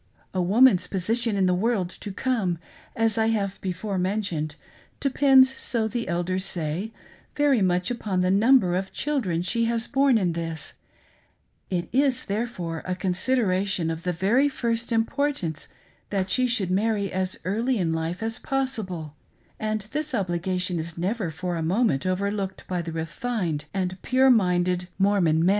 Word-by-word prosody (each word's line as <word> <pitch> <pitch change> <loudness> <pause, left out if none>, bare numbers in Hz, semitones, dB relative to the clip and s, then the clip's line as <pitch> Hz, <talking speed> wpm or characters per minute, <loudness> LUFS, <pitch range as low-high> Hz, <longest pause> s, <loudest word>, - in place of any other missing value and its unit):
A 185 - 0
woman's 190 0 +5
posi 200 +6 0
tion 230 -3 +1
in 195 -1 +2
the 180 - +3
world 200 0 +1
to 205 - -8
come, 200 -5 0 0.4
as 225 -1 +1
I 220 - +3
have 200 -4 -1
before 190 +1 -3
mentioned, 180 -6 -1 0.4
depends, 265 -1 +5
so 230 -4 0
the 235 +1 -3
elders 175 +2 -1
say, 175 +4 -2 0.4
very 285 -6 +3
much 180 +2 +1
upon 205 -6 -1
the 180 0 +2
number 205 -2 +4
of 190 +1 -2
children 215 - -1
she 230 +5 +1
has 230 0 0
borne 270 -3 +3
in 180 -5 +1
this; 165 -2 -5 1.0
it 175 -2 -1
is, 270 0 +2
therefore, 195 -6 -3
a 185 - -1
consideration 185 -2 +1
of 165 0 -5
the 180 - -1
very 210 - +2
first 235 -3 -2
importance 225 - -1 0.4
that 190 -2 -1
she 255 -1 +3
should 205 -7 0
marry 200 0 +1
as 185 0 -1
early 230 +7 0
in 170 -4 0
life 165 +5 -3
as 225 +1 -2
possi 265 -4 -1
ble, 160 -5 -7 0.4
and 215 0 -1
this, 300 -2 -2
obligation 180 -2 -1
is 165 +1 -6
never 190 +2 -1
for 175 +2 -3
a - - -2
moment 175 - +1
overlooked 195 +1 -2
by 180 -1 -1
the 165 -1 -5
refined 165 - -3
and 185 -1 -3
pure 260 +1 +4
minded 180 -4 +2
Mormon 190 -5 +3
men. - - +5
195 Hz, 160 wpm, -25 LUFS, 180-230 Hz, 1.0 s, woman's